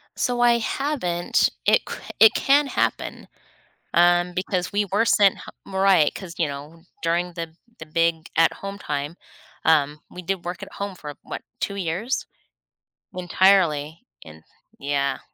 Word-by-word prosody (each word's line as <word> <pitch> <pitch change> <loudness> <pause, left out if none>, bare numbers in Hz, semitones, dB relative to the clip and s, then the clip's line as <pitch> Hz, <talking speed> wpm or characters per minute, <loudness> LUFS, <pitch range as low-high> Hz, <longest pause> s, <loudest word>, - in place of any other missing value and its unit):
So 245 -1 0
I 235 -1 +5
haven't 220 - 0 0.2
it - - +5
c - - -5 0.2
it 220 - +8
can 280 +1 +3
happen, - - -2 0.7
um, 175 +1 +4
because 185 -1 -2
we 205 +1 +1
were 205 +4 +1
sent 200 -4 +4
h - - -10 0.2
mo 190 -1 -5
right, 190 -6 +4
'cause, 180 -4 -8
you 165 - +2
know, 150 +4 -9 0.2
during 175 +1 0
the 165 -1 -6 0.3
the 160 - -8
big 165 +1 0
at 165 0 +5
home 195 0 -7
time, 145 +1 -4 0.5
um, 150 -2 +3
we 180 - -9
did 190 0 -3
work 175 +1 -5
at - - -9
home 200 -1 -4
for, 150 -3 -8
what, - - -7 0.2
2 200 - -2
years 195 +8 -2 0.9
entirely. 175 -4 +2 0.2
And 80 0 -13 0.4
yeah. 140 -1 -1
175 Hz, 155 wpm, -23 LUFS, 160-195 Hz, 0.9 s, it